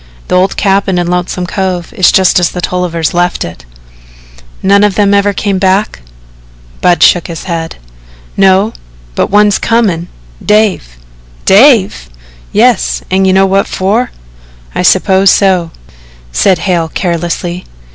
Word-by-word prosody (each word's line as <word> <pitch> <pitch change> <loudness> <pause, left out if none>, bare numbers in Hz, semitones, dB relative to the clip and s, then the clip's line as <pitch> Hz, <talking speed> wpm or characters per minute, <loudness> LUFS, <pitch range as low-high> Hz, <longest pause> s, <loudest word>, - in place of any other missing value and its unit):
"The - - +1
old 185 +1 +1
cabin 195 -2 0
in 175 - 0
Lonesome 180 +1 -2
Cove 185 +1 -4
is 190 -6 +3
just 185 -1 +3
as 175 - +1
the 180 - -7
Tollivers 175 -3 -2
left 175 0 -1
it." 85 -7 -11 1.0
"None 200 +1 +3
of 205 -2 +1
them 200 -1 +2
ever 200 0 +2
come 200 -1 -2
back?" 190 - 0 0.8
Budd 175 -1 +2
shook 175 - +3
his 165 -1 -7
head. 165 -3 -5 0.6
"No, 195 +3 +2 0.4
but - - -1
one's 205 0 +2
comin' 200 -8 0 0.4
Dave." 210 - 0 0.5
"Dave!" 195 - +3 0.4
"Yes, - - +1
an' 190 +1 +2
you 190 - +2
know 195 0 +3
what 195 +1 0
for." 210 +7 -1 0.6
"I - - -2
suppose 190 +1 +3
so," 185 -4 +2 0.6
said 180 - +2
Hale 175 -2 -1
carelessly. 175 +1 -3
185 Hz, 135 wpm, -10 LUFS, 175-200 Hz, 1.0 s, is